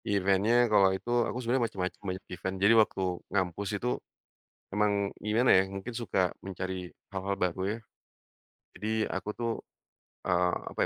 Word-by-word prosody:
Event-nya 100 +4 +3
kalau 105 -4 +5
itu 115 +6 -6 0.2
aku - - -4
sebenarnya 120 +1 +2
macem-macem 95 -3 -4
banyak 95 -1 -5
event. 95 +1 -3
Jadi 100 +4 +5
waktu 110 -3 +4 0.3
ngampus 95 +1 -1
itu, 120 - -3 0.9
emang 100 -1 +1
gimana, 110 +4 +2
ya, 95 - +7
mungkin 95 +5 -6
suka 95 -6 0
mencari 95 -1 -4 0.2
hal-hal 100 +1 -2
baru, 90 -1 -1 0.2
ya. - - -10 1.0
Jadi 105 - -3 0.2
aku, 95 +2 -3
tuh, 115 -1 -1 0.7
eee, 90 -1 +2 0.2
apa, - - -14
100 Hz, 145 wpm, -30 LUFS, 95-110 Hz, 1.0 s, ya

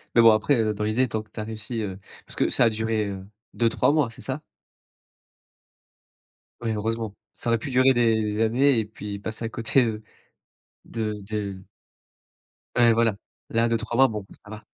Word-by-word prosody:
Mais 115 - +7
bon 115 -1 +8
après, 110 +6 +3
heu, 110 -1 +1
dans 105 +1 -4
l'idée, 115 +4 +1
tant 110 0 -2
que 110 - -19
tu - - -8
as - - -2
réussi, 110 +1 -5
heu, 95 -2 -5 0.3
parce - - -5
que - - +1
ça 120 - +4
a - - +5
duré, 110 -1 -1
heu, 95 -1 -6 0.3
2-3 115 +4 +2
mois, 150 -6 +2
c'est 115 - -11
ça? 135 +3 -4 2.2
Oui 115 -2 -1
heureusement, 110 0 -2 0.2
ça 120 - -4
aurait 115 - +3
pu 140 - -5
durer 130 +1 +5
des 110 -3 +1
années 125 +3 +3
et 110 - -1
puis 105 -1 -7
passer 110 +3 -5
à - - -2
côté, 120 +3 +2
heu, 110 -2 -3 0.8
de 110 -2 -3 0.2
de 100 -3 -3 1.2
Ouais, 120 -1 +6
voilà, 115 -2 +2 0.4
là, 115 +1 +2
2-3 115 0 -1
mois, 135 +1 +6
bon 105 -2 -5 0.2
ça 105 - -15
va. 105 0 -9
110 Hz, 185 wpm, -25 LUFS, 105-120 Hz, 2.2 s, bon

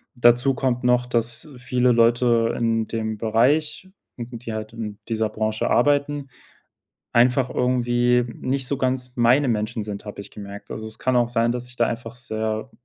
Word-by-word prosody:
dazu 120 +2 +4
kommt 125 -1 -1
noch, 125 0 +3
dass 120 +1 -1
viele 125 0 +1
Leute 115 0 +3
in 115 -1 0
dem 110 -1 -3
Bereich, 135 - +1 0.3
die 120 -1 -7
halt 110 0 -6
in 110 -3 -6
dieser 110 -1 0
Branche 110 0 -1
arbeiten 145 +2 +1 0.9
einfach 125 +2 +4
irgendwie 125 -1 +2
nicht 130 0 -2
so 140 - 0
ganz 130 -1 -2
meine 125 +4 +4
Menschen 110 0 -1
sind, 100 -1 -6
habe 105 -1 -7
ich 100 - -10
gemerkt. 100 -1 -10
Also, 110 - -5
es 110 0 -11
kann 130 -1 +1
auch 120 -1 +3
sein, 120 0 +1
dass 125 0 -5
ich 125 - -13
da 120 - +3
einfach 115 0 -5
sehr, 110 0 -3
120 Hz, 170 wpm, -23 LUFS, 110-125 Hz, 0.9 s, dazu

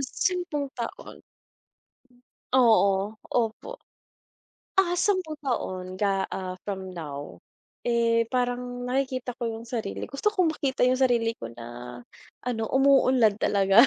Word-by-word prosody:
10 300 0 -1
taon. 235 -2 -6 1.3
Oo, 215 -5 +4 0.2
opo. 240 - -1 0.9
Ah, 355 -2 +3
10 360 -5 +1
taon 185 -10 -3
ga 195 0 +1
ah, 185 -1 -5
from 190 -2 -4
now. 145 -5 -7 0.5
Eh, 230 -1 +3
parang 245 0 -2
nakikita 255 -1 -1
ko 240 - -2
yung 225 0 -4
sarili 225 -5 -3
gusto 420 +11 0
kong 365 -5 +3
makita 265 -3 -1
yung 255 - +3
sarili 240 -3 +3
ko - - -6
na 120 +1 -8 0.4
ano, 240 -3 -2
umuunlad 260 -5 +5
talaga. 200 +4 +5
235 Hz, 115 wpm, -27 LUFS, 195-270 Hz, 1.3 s, umuunlad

